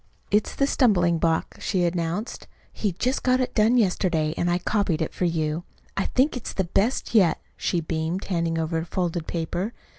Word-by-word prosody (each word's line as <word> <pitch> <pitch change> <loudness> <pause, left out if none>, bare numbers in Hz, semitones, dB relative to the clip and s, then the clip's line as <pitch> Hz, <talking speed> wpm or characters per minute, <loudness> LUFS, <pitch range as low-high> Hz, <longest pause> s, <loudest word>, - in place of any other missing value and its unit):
"It's 210 0 +1
'The 275 - +2
Stumbling 180 - +3
Block,'" 165 0 0
she 185 -3 0
announced. 175 +5 -2 0.3
"He 205 -4 -1
just 250 +9 -1
got 255 0 +3
it 255 - -1
done 225 +3 +4
yesterday, 180 -7 +1
an' 175 - 0
I 175 - +2
copied 180 -3 0
it 160 - -2
for 180 - -1
you. 160 -1 -1 0.3
I 195 - 0
think 260 +3 +2
it's 250 - -5
the 190 - 0
best 205 +10 0
yet," 185 -8 +4 0.2
she 175 - -1
beamed, 160 +3 -2
handing 170 -3 -1
over 160 0 -1
a 160 - -4
folded 175 -2 -2
paper. 175 +6 -2
175 Hz, 185 wpm, -25 LUFS, 165-210 Hz, 0.3 s, done